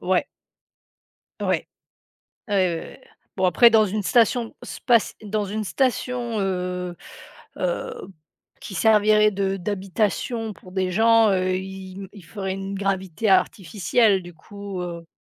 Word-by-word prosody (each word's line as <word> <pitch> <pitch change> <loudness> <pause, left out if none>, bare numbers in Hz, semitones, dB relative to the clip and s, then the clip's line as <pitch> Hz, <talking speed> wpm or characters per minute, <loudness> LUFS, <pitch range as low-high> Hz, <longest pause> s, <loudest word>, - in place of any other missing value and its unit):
ouais. - - +1 1.2
Ouais. - - -1 0.8
Ah 205 - -2
ouais, 185 -3 +2
ouais, 165 - -4
ouais, - - -14 0.4
bon, 185 -1 +2
après 205 +7 +6
dans 220 -1 +5
une 210 +2 -2
station 230 +2 +2
spaci 235 -4 +1
dans 210 0 -1
une 215 +2 -3
station, 245 -1 -1
heu 180 -2 -2 0.6
heu, - - -2 0.7
qui 195 - -8
servirait 215 +1 +4
de 195 0 -1
d'habitation 210 +4 -2
pour 185 - -15
des 185 -1 -1
gens, 225 +1 +5
heu, 185 0 +1
ils 190 0 -7
m 195 - -8
ils 200 -4 -13
feraient 190 +2 -4
une 195 0 -5
gravité 195 0 -1
artificielle, 195 +2 +2
du 175 0 -11
coup, 200 +2 -7
heu 170 -1 -6
195 Hz, 140 wpm, -23 LUFS, 185-220 Hz, 1.2 s, après